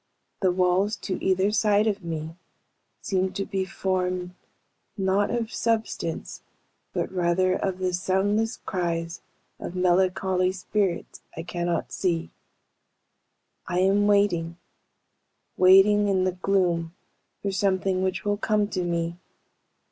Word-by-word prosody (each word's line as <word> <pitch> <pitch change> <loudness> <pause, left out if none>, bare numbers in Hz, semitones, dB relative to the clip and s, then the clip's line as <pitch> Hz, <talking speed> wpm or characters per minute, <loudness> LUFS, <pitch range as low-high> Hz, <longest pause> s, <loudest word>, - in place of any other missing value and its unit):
The 185 -2 +2
walls 185 +4 +2
to 190 - -5
either 190 +2 +2
side 210 0 +3
of 205 -3 -1
me 160 -1 -5 0.7
seem 190 -1 0
to 195 - -3
be 190 -1 -2
formed, 185 -1 -2 0.6
not 195 +1 +1
of 230 -2 -2
substance, 220 -7 -2 0.5
but - - -2
rather 185 0 +2
of 190 0 -2
the 185 -1 -1
soundless 200 +5 0
cries 170 -2 -2 0.4
of 180 - -6
melancholy 185 0 +2
of 185 - -4
spirits 190 -1 -2 0.2
I 165 - -4
cannot 175 -1 -2
see. 170 -3 -1 1.4
"I 180 - -2
am 200 +2 +3
waiting, 175 -5 +2 1.0
waiting 195 +3 +6
in 190 -2 +2
the 185 - +1
gloom 180 -3 0 0.5
for 200 - -1
something 190 -1 +1
which 190 +1 -2
will 205 0 +1
come 210 -1 +1
to 185 -3 -2
me. 170 0 -2
185 Hz, 125 wpm, -25 LUFS, 180-200 Hz, 1.4 s, waiting